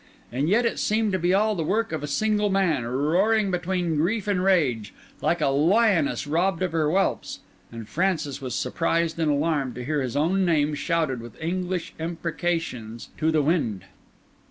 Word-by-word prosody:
And 135 Hz, +6 st, -1 dB
yet 235 Hz, +5 st, +3 dB
it 230 Hz, -, -1 dB
seemed 215 Hz, 0 st, +1 dB
to 185 Hz, -, 0 dB
be 175 Hz, +1 st, +1 dB
all 215 Hz, +3 st, +3 dB
the 170 Hz, -5 st, -2 dB
work 220 Hz, +8 st, 0 dB
of 160 Hz, -2 st, -3 dB
a 145 Hz, -, -4 dB
single 210 Hz, +6 st, +1 dB
man, 185 Hz, -9 st, +1 dB
roaring 185 Hz, -, +2 dB
between 180 Hz, -2 st, -1 dB
grief 200 Hz, +7 st, 0 dB
and 190 Hz, -3 st, +1 dB
rage, 135 Hz, -, +1 dB, 0.3 s
like 170 Hz, -1 st, +1 dB
a 145 Hz, -, +3 dB
lioness 165 Hz, +3 st, +2 dB
robbed 170 Hz, +4 st, 0 dB
of 180 Hz, -, -1 dB
her 160 Hz, -2 st, +1 dB
whelps; 190 Hz, +4 st, -1 dB, 0.3 s
and 115 Hz, -2 st, -8 dB
Francis 160 Hz, -, -1 dB
was 125 Hz, -2 st, -4 dB
surprised 165 Hz, 0 st, -1 dB
and 160 Hz, -2 st, +1 dB
alarmed 145 Hz, -3 st, 0 dB
to 125 Hz, 0 st, -6 dB
hear 150 Hz, +1 st, 0 dB
his 125 Hz, -1 st, -3 dB
own 180 Hz, +6 st, +2 dB
name 155 Hz, -4 st, +2 dB
shouted 150 Hz, -4 st, -1 dB
with 120 Hz, -1 st, -12 dB
English 180 Hz, +1 st, -3 dB
imprecations 165 Hz, -8 st, -3 dB
to 160 Hz, -, +2 dB
the 155 Hz, -2 st, +2 dB
wind. 140 Hz, -, 0 dB
165 Hz, 180 wpm, -25 LUFS, 145-190 Hz, 0.3 s, yet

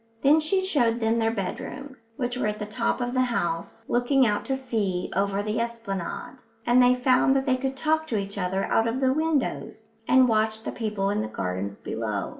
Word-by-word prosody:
Then 290 Hz, +3 st, +6 dB
she 375 Hz, +5 st, 0 dB
showed 240 Hz, -10 st, +2 dB
them 225 Hz, 0 st, +1 dB
their 225 Hz, 0 st, +2 dB
bedrooms, 230 Hz, +3 st, -6 dB
which 245 Hz, -1 st, -2 dB
were 250 Hz, -, -1 dB
at 210 Hz, 0 st, -2 dB
the 210 Hz, -, -4 dB
top 230 Hz, +4 st, -1 dB
of 245 Hz, 0 st, -2 dB
the 255 Hz, -, +2 dB
house, 175 Hz, -9 st, -2 dB
looking 250 Hz, +2 st, +3 dB
out 210 Hz, -2 st, 0 dB
to 270 Hz, -, 0 dB
sea 210 Hz, -9 st, -2 dB
over 200 Hz, +1 st, 0 dB
the 215 Hz, +2 st, -1 dB
esplanade; 230 Hz, 0 st, -4 dB, 0.3 s
and 245 Hz, +1 st, +5 dB
they 250 Hz, 0 st, +5 dB
found 255 Hz, +1 st, +3 dB
that 270 Hz, 0 st, +1 dB
they 260 Hz, -2 st, +3 dB
could 265 Hz, +1 st, -3 dB
talk 315 Hz, +2 st, +1 dB
to 225 Hz, -, -1 dB
each 200 Hz, 0 st, -4 dB
other 190 Hz, +1 st, -1 dB
out 225 Hz, -, +2 dB
of 230 Hz, +3 st, -1 dB
the 260 Hz, -1 st, +3 dB
windows 280 Hz, -7 st, -2 dB, 0.2 s
and 260 Hz, 0 st, +6 dB
watch 220 Hz, -1 st, +1 dB
the -, -, -3 dB
people 210 Hz, -3 st, -2 dB
in 205 Hz, -, 0 dB
the 110 Hz, -, -3 dB
gardens 95 Hz, -1 st, -4 dB
below. 105 Hz, -3 st, -3 dB
230 Hz, 210 wpm, -26 LUFS, 205-260 Hz, 0.3 s, Then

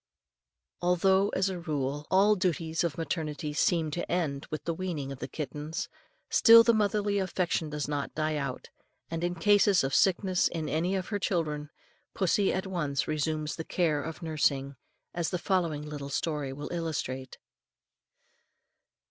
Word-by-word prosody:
Although, 190 Hz, +3 st, +3 dB
as 190 Hz, +1 st, +2 dB
a 185 Hz, -2 st, -4 dB
rule, 145 Hz, -3 st, -3 dB
all 195 Hz, +3 st, +5 dB
the 205 Hz, -, -3 dB
duties 165 Hz, -2 st, 0 dB
of 170 Hz, -3 st, -2 dB
maternity 155 Hz, -1 st, -3 dB
seem 160 Hz, 0 st, +1 dB
to 175 Hz, -, -4 dB
end 150 Hz, -6 st, -1 dB
with 155 Hz, -2 st, -4 dB
the 170 Hz, -, -1 dB
weaning 160 Hz, -6 st, -4 dB
of 135 Hz, -, -7 dB
the -, -, -4 dB
kitten, 150 Hz, +1 st, -6 dB, 0.5 s
still 230 Hz, 0 st, +8 dB
the 235 Hz, -, +4 dB
motherly 205 Hz, -1 st, +1 dB
affection 175 Hz, -4 st, -1 dB
does 150 Hz, -1 st, -3 dB
not 145 Hz, -1 st, -3 dB
die 155 Hz, 0 st, 0 dB
out; 140 Hz, -3 st, -4 dB, 0.4 s
and 165 Hz, 0 st, -3 dB
in 175 Hz, 0 st, 0 dB
cases 205 Hz, +1 st, +4 dB
of 135 Hz, 0 st, -1 dB
sickness 185 Hz, -1 st, +3 dB
in 160 Hz, -2 st, -4 dB
any 175 Hz, +5 st, 0 dB
of 185 Hz, -1 st, -3 dB
her 205 Hz, -2 st, -1 dB
children, 150 Hz, -6 st, -1 dB, 0.5 s
pussy 195 Hz, +1 st, +2 dB
at 190 Hz, -, -2 dB
once 150 Hz, -7 st, -2 dB
resumes 155 Hz, 0 st, -1 dB
the 165 Hz, -, -3 dB
cares 155 Hz, -4 st, 0 dB
of 165 Hz, +2 st, -7 dB
nursing, 140 Hz, -3 st, 0 dB, 0.4 s
as 170 Hz, -1 st, -1 dB
the 180 Hz, -, -1 dB
following 170 Hz, -5 st, 0 dB
little 145 Hz, -2 st, -6 dB
story 145 Hz, -1 st, -2 dB
will 145 Hz, +2 st, -6 dB
illustrate. 145 Hz, -6 st, -3 dB
165 Hz, 160 wpm, -29 LUFS, 150-185 Hz, 0.5 s, still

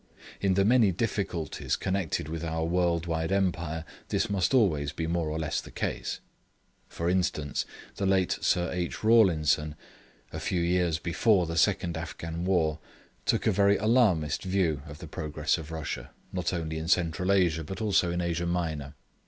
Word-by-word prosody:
In 95 Hz, -2 st, +2 dB
the 100 Hz, 0 st, +3 dB
many 115 Hz, -3 st, +5 dB
difficulties 95 Hz, -5 st, -2 dB
connected 95 Hz, -6 st, -2 dB
with 80 Hz, +1 st, -5 dB
our 80 Hz, 0 st, -1 dB
world 85 Hz, -1 st, +1 dB
wide 80 Hz, 0 st, -1 dB
Empire 85 Hz, -4 st, 0 dB, 0.2 s
this -, -, 0 dB
must 95 Hz, -3 st, +1 dB
always 80 Hz, -, +2 dB
be 80 Hz, +2 st, -3 dB
more 85 Hz, -1 st, -1 dB
or 75 Hz, -, -2 dB
less 75 Hz, -3 st, -1 dB
the -, -, -12 dB
case. -, -, -3 dB, 0.7 s
For 85 Hz, -, -3 dB
instance, 85 Hz, -5 st, 0 dB, 0.3 s
the 100 Hz, -, 0 dB
late 95 Hz, -2 st, +2 dB
Sir 90 Hz, -1 st, +1 dB
H. 90 Hz, +1 st, -3 dB
Rawlinson, 80 Hz, -9 st, +4 dB, 0.6 s
a -, -, -4 dB
few 90 Hz, -2 st, -1 dB
years 85 Hz, -1 st, +1 dB
before 90 Hz, +3 st, +2 dB
the 85 Hz, 0 st, -4 dB
second 85 Hz, -2 st, +2 dB
Afghan 85 Hz, 0 st, -5 dB
war, 80 Hz, -5 st, +1 dB, 0.5 s
took -, -, +2 dB
a -, -, +4 dB
very 100 Hz, +1 st, +4 dB
alarmist 105 Hz, -, +2 dB
view 90 Hz, -6 st, 0 dB
of 75 Hz, 0 st, -9 dB
the 80 Hz, 0 st, -9 dB
progress 75 Hz, +1 st, -1 dB
of 80 Hz, -1 st, -8 dB
Russia, 80 Hz, -2 st, -5 dB, 0.2 s
not 90 Hz, -3 st, -1 dB
only 80 Hz, -3 st, -3 dB
in 80 Hz, -, -5 dB
Central 90 Hz, +1 st, +1 dB
Asia 85 Hz, -5 st, +2 dB
but 95 Hz, +7 st, -6 dB
also 100 Hz, -5 st, +2 dB
in 85 Hz, +1 st, -1 dB
Asia 85 Hz, 0 st, -1 dB
Minor. 80 Hz, -5 st, -2 dB
85 Hz, 170 wpm, -28 LUFS, 80-95 Hz, 0.7 s, many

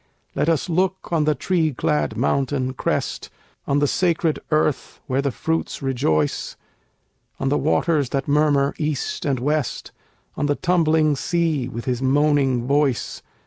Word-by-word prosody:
Let 160 Hz, -, 0 dB
us 165 Hz, -3 st, +1 dB
look 185 Hz, +2 st, -1 dB
on 155 Hz, -2 st, +2 dB
the 150 Hz, 0 st, +2 dB
tree 160 Hz, -1 st, 0 dB
clad 150 Hz, +4 st, 0 dB
mountain 130 Hz, -1 st, 0 dB
crest, -, -, -2 dB, 0.4 s
On 140 Hz, -, +2 dB
the 145 Hz, -, +3 dB
sacred 165 Hz, 0 st, +1 dB
earth 155 Hz, -3 st, 0 dB
where 130 Hz, +1 st, 0 dB
the 140 Hz, -, 0 dB
fruits 160 Hz, +3 st, -3 dB
rejoice, 80 Hz, -, 0 dB, 0.8 s
On 135 Hz, -, 0 dB
the 145 Hz, -, +2 dB
waters 155 Hz, -3 st, +1 dB
that 135 Hz, +2 st, -2 dB
murmur 145 Hz, -1 st, +2 dB
east 150 Hz, -3 st, -2 dB
and 135 Hz, -4 st, 0 dB
west, 145 Hz, 0 st, -2 dB, 0.4 s
On 145 Hz, -, -1 dB
the 145 Hz, -, +1 dB
tumbling 160 Hz, -3 st, +2 dB
sea 160 Hz, -3 st, 0 dB
with 120 Hz, -1 st, -6 dB
his 125 Hz, -1 st, -1 dB
moaning 135 Hz, -2 st, +2 dB
voice. 140 Hz, -2 st, 0 dB
145 Hz, 145 wpm, -22 LUFS, 135-155 Hz, 0.8 s, the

